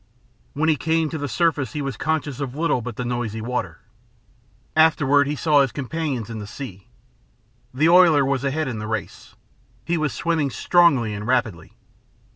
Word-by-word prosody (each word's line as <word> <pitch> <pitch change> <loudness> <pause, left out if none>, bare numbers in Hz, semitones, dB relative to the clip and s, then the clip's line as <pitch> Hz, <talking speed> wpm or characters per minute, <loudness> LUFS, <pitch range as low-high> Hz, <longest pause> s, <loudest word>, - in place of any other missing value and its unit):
When 155 +3 0
he 155 -2 +3
came 160 +1 0
to 160 - -4
the 145 - -3
surface 140 -1 0
he 150 - -3
was 135 -1 -4
conscious 150 -4 -2
of 135 -2 -4
little 155 -5 0
but 120 -1 -6
the 125 - -4
noisy 120 -3 -3
water. 125 +3 -4 0.9
Afterward 145 -3 +4
he 150 - -2
saw 150 -1 +3
his 135 -3 +1
companions 140 -4 -3
in 115 -2 -6
the 105 - -7
sea. 100 -6 -9 0.8
The 145 +5 +2
oiler 170 -5 +6
was 135 -1 -1
ahead 145 +2 -1
in 120 -4 -4
the 105 - -5
race. 110 -4 -6 0.5
He 170 +3 0
was 155 -3 0
swimming 160 -2 -1
strongly 135 -7 +3
and 105 +1 -6
rapidly. 115 -10 -1
140 Hz, 175 wpm, -22 LUFS, 120-155 Hz, 0.9 s, oiler